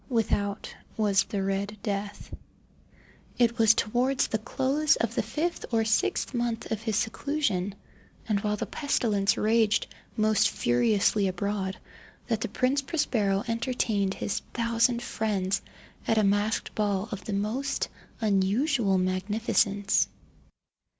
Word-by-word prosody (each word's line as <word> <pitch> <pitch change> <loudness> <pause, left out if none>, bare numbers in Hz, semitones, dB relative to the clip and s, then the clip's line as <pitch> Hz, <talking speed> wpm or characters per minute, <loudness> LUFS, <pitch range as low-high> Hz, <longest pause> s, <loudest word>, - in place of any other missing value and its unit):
Without 205 -4 -1 0.2
was 200 -3 +3
the 200 -2 -2
"Red 195 +2 -2
Death". 205 0 -4 1.0
It 235 -1 +2
was 225 -1 +6
towards 250 +5 +1
the 220 - -2
close 270 +6 +1
of 230 -1 -1
the - - +1
fifth 305 +11 -3
or 225 -1 +2
sixth 220 +4 +1
month 235 -2 -2
of 220 -1 -1
his 220 -2 -1
seclusion, 220 -7 -1 0.5
and 210 -3 +1
while 210 +1 -1
the - - -2
pestilence 210 -9 +1
raged 220 -1 +3 0.3
most 215 -1 +3
furiously 200 - +2
abroad, 190 +1 -2 0.5
that 225 -3 -1
the - - -1
Prince 255 +6 +1
Prospero 220 - 0
entertained 230 -4 0
his - - -2 0.2
thousand 235 +1 +2
friends 200 -4 -1 0.5
at 225 - +2
a 215 - +4
masked 205 +2 +1
ball 205 -1 0
of 200 -2 -6
the 210 - -3
most 215 +8 -1 0.3
unusual 210 +2 +2
magnificence. 200 +2 +1
215 Hz, 125 wpm, -27 LUFS, 200-235 Hz, 1.0 s, was